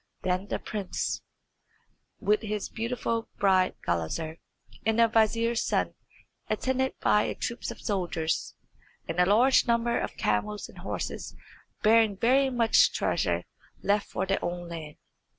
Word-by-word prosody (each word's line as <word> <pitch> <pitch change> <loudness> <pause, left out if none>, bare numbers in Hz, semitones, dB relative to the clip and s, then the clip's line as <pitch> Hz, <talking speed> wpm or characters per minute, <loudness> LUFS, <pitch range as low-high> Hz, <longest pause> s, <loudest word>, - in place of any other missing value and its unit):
Then 185 +2 0
the - - -1
prince, 205 -3 -3 1.0
with 210 +1 +2
his 210 -2 -3
beautiful 230 0 -2
bride 185 -2 +3
Gulizar, 90 - -2 0.5
and 220 +1 +1
the 230 0 +6
vizier's 230 +1 +2
son, - - 0 0.6
attended 260 +4 0
by 210 - +4
a - - -2
troop 235 0 -4
of - - -7
soldiers, 175 -6 -1 0.5
and 165 +2 -3
a 180 - +5
large 245 +7 +5
number 235 0 +2
of - - -4
camels 205 - -1
and - - -13
horses - - -5 0.5
bearing 220 -2 +5
very 265 +5 +3
much 235 -3 +4
treasure, - - 0 0.4
left 205 0 +1
for 190 - -2
their 195 +1 -1
own 175 0 -4
land. 155 -3 -7
210 Hz, 135 wpm, -28 LUFS, 180-230 Hz, 1.0 s, the